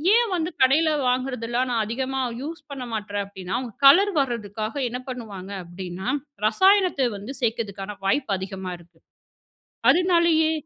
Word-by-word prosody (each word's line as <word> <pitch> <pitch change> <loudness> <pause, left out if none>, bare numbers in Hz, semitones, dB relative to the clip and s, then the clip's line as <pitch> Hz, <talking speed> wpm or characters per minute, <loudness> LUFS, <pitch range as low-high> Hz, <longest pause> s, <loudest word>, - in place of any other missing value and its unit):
ஏன் 475 -1 +3
வந்து 330 0 -1
கடைல 305 +5 +4 0.2
வாங்குறதெல்லாம் 250 -1 0
நான் 225 -2 +1
அதிகமா 260 +4 -2 0.2
யூஸ் 315 +3 -6
பண்ண 265 -2 -5
மாட்றேன் 205 -1 -2
அப்டின்னா, 190 -2 -6
அவங்க 240 -5 -7
கலர் 385 +9 +7
வர்றதுக்காக 220 -4 -2
என்ன 250 +1 -4
பண்ணுவாங்க 205 -6 -7
அப்டின்னா, 180 +1 -6 0.4
ரசாயனத்த 365 - +4
வந்து 215 +8 -7
சேக்கறதுக்கான 210 -4 -3
வாய்ப்பு 210 +1 +1
அதிகமா 190 -1 -5
இருக்கு. 170 -1 -21 0.9
அதுனாலயே 335 -1 +4
240 Hz, 130 wpm, -24 LUFS, 200-285 Hz, 0.9 s, கலர்